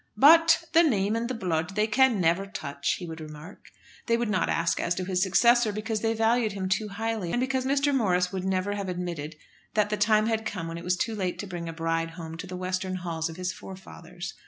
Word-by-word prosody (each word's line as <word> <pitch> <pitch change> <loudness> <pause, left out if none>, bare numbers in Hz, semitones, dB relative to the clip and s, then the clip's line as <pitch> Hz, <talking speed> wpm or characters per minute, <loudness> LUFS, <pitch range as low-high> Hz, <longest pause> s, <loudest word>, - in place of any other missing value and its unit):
"But 330 +6 +7
the 335 - +7
name 215 - +2
and 235 +1 -2
the 255 - -2
blood 180 -3 -2
they 210 0 +3
can 235 0 +3
never 175 +3 +2
touch," 140 -7 -3
he 180 - -7
would 165 -1 -7
remark. 155 +4 -11 0.4
They 230 -1 +3
would 235 -2 -1
not - - +1
ask 165 0 +1
as 175 - 0
to 185 - -3
his 180 -1 0
successor, 235 +4 +4
because 215 +1 -3
they 225 0 0
valued 225 -1 +2
him 190 -2 -3
too 210 +3 0
highly, 210 -3 -3
and 240 - 0
because 260 0 0
Mr. 280 +1 +2
Morris 180 -8 +2
would 190 -2 -3
never 190 +1 0
have 200 -2 -4
admitted 170 -4 -4 0.4
that 210 -1 +2
the 210 - 0
time 215 +1 +3
had 220 -1 0
come 180 -6 -4
when 165 0 -5
it - - -10
was 180 +1 0
too 225 +4 -1
late 185 -4 -2
to - - -5
bring 175 -3 -6
a - - -5
bride 165 0 -1
home 165 -1 -7
to 190 - -7
the 180 0 -6
western 185 +1 -2
halls 165 -3 -3
of 165 - -8
his 185 0 -2
forefathers. 185 -2 -9
190 Hz, 235 wpm, -27 LUFS, 175-225 Hz, 0.4 s, But